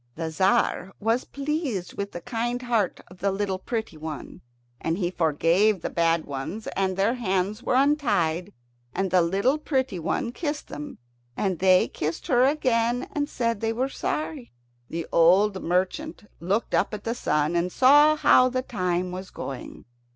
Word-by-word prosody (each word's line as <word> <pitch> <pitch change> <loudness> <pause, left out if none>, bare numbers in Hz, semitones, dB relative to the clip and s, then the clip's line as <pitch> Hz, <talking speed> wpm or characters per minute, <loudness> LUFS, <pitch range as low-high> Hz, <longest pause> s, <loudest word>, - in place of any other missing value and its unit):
The 165 0 -3
Tzar 190 +2 +1
was 225 +4 0
pleased 280 - -3
with 200 0 -4
the 175 - -7
kind 240 0 -2
heart 230 -7 0
of 180 0 -15
the 200 +1 +1
little 195 -1 -2
pretty 220 -5 -4
one, 155 -1 -7 0.4
and 165 +1 -1
he 180 -3 -1
forgave 170 +5 +2
the - - -3
bad 165 -1 +1
ones, 145 +10 -5
and 190 -1 0
their 200 +4 +2
hands 200 -2 -1
were 250 - 0
untied, 215 - +1 0.4
and 195 -1 -1
the 185 - +5
little 200 - +1
pretty 260 - -1
one 170 +7 -1
kissed 295 +2 -4
them, 295 -1 -7 0.4
and 190 -4 -1
they 185 -1 +5
kissed 155 +2 -4
her 255 -5 +4
again 245 -4 +1
and 290 0 -1
said 230 -3 -1
they 225 0 0
were 255 +4 -1
sorry. 300 -1 -4 0.4
The 165 0 -4
old 190 +4 +4
merchant 190 - -1 0.2
looked 195 +7 -1
up - - +1
at 205 - -9
the 230 - -1
sun, 150 -8 0
and 175 +1 0
saw 290 +6 +6
how 255 -4 +5
the 255 0 -2
time 180 -6 -1
was 185 +1 -6
going. 135 -2 -8
200 Hz, 165 wpm, -25 LUFS, 180-250 Hz, 0.4 s, saw